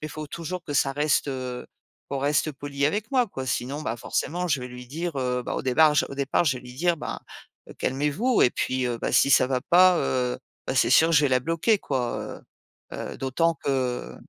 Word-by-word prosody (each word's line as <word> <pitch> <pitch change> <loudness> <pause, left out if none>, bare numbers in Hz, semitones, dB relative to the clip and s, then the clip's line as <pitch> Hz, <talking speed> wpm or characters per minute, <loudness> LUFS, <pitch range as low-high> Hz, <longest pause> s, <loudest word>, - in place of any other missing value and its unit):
mais 155 - -5
faut 155 -1 -7
toujours 170 +2 -5
que 145 - -6
ça 135 0 +2
reste, 150 +1 +1
heu 130 -2 -5 0.4
qu'on 140 - -3
reste 145 +2 +1
poli 140 0 -2
avec 205 +8 -2
moi, 255 -3 +3
quoi. 130 -10 -6
Sinon, 130 +4 -2
bah, 115 -5 -3
forcément 175 +9 -2
je 145 -6 0
vais 125 - -6
lui 125 0 -10
dire, 160 +4 -4
heu, 125 -1 -1
bah, - - -4
au - - -3
départ 150 +4 +4
j - - +3
au - - -7
départ, 140 +4 +1
je 130 -5 +1
vais - - -14
lui 125 0 -11
dire: 170 +5 +1
«Ben, - - -5 0.5
heu, - - -11
calmez-vous», 150 - +1
et 125 - +5
puis, 130 +1 -1
heu, 120 -1 -2
bah, - - -2
si - - +4
ça 130 - +5
va 130 -1 0
pas, 180 +4 +5
heu, 125 -4 -1 0.3
bah, 130 - -1
c'est - - +3
sûr 160 - +6
que 165 - +2
je 150 - +5
vais 145 - +3
la 130 0 +2
bloquer, 165 - +1
quoi, 130 -7 -2 0.7
heu - - -5
heu, - - -6
d'autant 165 +6 0
que 130 -3 -1
140 Hz, 235 wpm, -25 LUFS, 130-165 Hz, 0.7 s, sûr